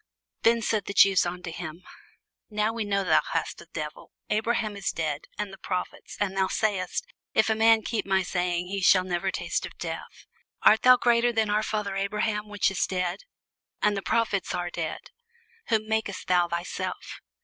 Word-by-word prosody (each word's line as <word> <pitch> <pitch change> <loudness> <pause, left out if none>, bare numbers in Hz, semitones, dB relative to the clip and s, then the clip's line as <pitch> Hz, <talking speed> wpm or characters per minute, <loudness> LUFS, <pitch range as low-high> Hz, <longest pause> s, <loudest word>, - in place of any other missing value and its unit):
Then 230 0 +3
said 215 -3 0
the 200 - -5
Jews 195 -3 +6
unto 180 -1 -5
him, 165 +1 -7 0.7
Now 215 +1 0
we 230 -1 -2
know 200 -1 0
that 160 -4 +4
thou - - -9
hast - - -8
a - - -14
devil. 150 -2 -6 0.2
Abraham 215 0 0
is 200 -2 -2
dead, 155 -2 -3
and 210 -2 -4
the 195 - -11
prophets; 180 0 -5
and 195 -2 -1
thou 190 -1 +2
sayest, 200 - -1 0.3
If - - +4
a - - +2
man 225 0 +5
keep 225 -1 -2
my 190 -1 +2
saying, 180 -1 -1
he 195 +2 -3
shall 185 0 +6
never 185 +1 -1
taste - - -2
of - - -8
death. - - -7 0.4
Art 220 - +6
thou 255 0 +8
greater 240 0 +3
than 220 -2 +1
our 210 +1 +2
father 210 -2 -2
Abraham, 210 +2 -1
which 205 -1 +1
is 190 - 0
dead? 180 - -2 0.5
and 210 0 +2
the 195 - -2
prophets 205 -2 0
are 175 0 -3
dead: 165 -3 -5 0.6
whom 215 -1 +1
makest 220 -3 -2
thou 180 -1 +3
thyself? 170 +1 -4
200 Hz, 185 wpm, -27 LUFS, 180-215 Hz, 0.7 s, thou